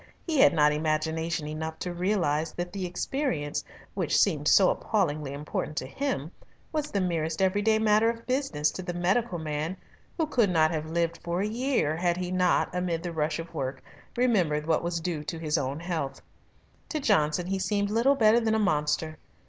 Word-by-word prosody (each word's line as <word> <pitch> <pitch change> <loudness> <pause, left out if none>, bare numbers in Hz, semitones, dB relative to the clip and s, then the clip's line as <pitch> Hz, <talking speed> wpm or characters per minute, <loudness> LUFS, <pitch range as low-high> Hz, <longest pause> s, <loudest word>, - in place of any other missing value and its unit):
He 315 -5 0
had - - +7
not 150 -3 +4
imagination 160 +1 -1
enough 160 +1 -4
to 180 - -4
realise 175 -4 0
that 175 +1 -5
the 190 -2 -3
experience 175 - -2 0.3
which - - 0
seemed - - +2
so - - +6
appallingly 155 -9 -1
important 150 +1 -4
to - - -1
him, 170 - -3 0.4
was 300 -1 -1
the 200 - -1
merest 165 -3 -1
everyday 205 +3 +3
matter 220 +1 +4
of 230 0 -5
business 255 - 0
to - - -6
the 175 -1 -5
medical 185 +3 +1
man 155 +3 -3 0.4
who 325 - +2
could 240 -9 +2
not 160 -2 +3
have 155 -1 -3
lived 170 0 -1
for 170 +2 -1
a - - 0
year 230 - 0
had 175 0 +1
he 180 0 -3
not, 180 -1 +2
amid 180 -2 -1
the 175 -1 -4
rush 155 0 0
of 165 0 -7
work, 130 -1 -4 0.3
remembered 180 -12 +2
what 160 -1 +2
was 170 0 -2
due 160 -2 -3
to 165 - -4
his 155 -1 -1
own 140 -1 -1
health. 165 -5 -3 0.7
To 310 - -2
Johnson 175 - +2
he 190 +1 -2
seemed 200 +2 0
little 240 +6 +3
better 225 -2 +5
than 220 -2 +1
a - - +3
monster. 155 -4 0
175 Hz, 190 wpm, -27 LUFS, 155-210 Hz, 0.7 s, had